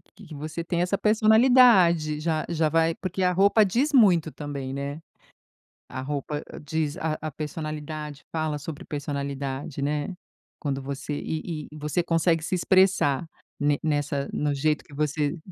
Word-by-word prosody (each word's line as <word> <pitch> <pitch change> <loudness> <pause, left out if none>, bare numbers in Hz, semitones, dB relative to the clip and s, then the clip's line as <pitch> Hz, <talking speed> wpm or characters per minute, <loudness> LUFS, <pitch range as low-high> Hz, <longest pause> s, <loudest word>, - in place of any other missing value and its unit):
que 205 - -14
que 160 - -10
você 155 +3 -5
tem 170 0 -1
essa 180 +3 +1
personalidade. 215 -8 +5
Já 155 -1 0
já 160 -2 +1
vai 165 +1 +2
porque 190 0 -4
a 180 - +3
roupa 200 +3 +5
diz 250 +10 +1
muito 180 - +5
também, 140 -3 -5
né. 140 +3 -4 0.9
A 130 - -6
roupa 145 +2 -3 0.2
diz 150 0 -2
a 155 -1 -2
a 155 0 -4
personalidade, 150 0 -6
fala 155 -2 -1
sobre 145 +1 -7
personalidade, 140 0 -4
né, 150 +5 -2 0.4
quando 140 -3 -2
você 140 +2 -5
e 155 0 -4
e 155 - -10
você 150 +4 -1
consegue 165 -1 +2
se 185 - -1
expressar 180 -5 +3 0.3
ne 145 0 +2
nessa 145 -2 -1
no 150 -1 0
jeito 150 +2 0
que - - -18
você 150 +1 -1
155 Hz, 155 wpm, -26 LUFS, 145-170 Hz, 0.9 s, personalidade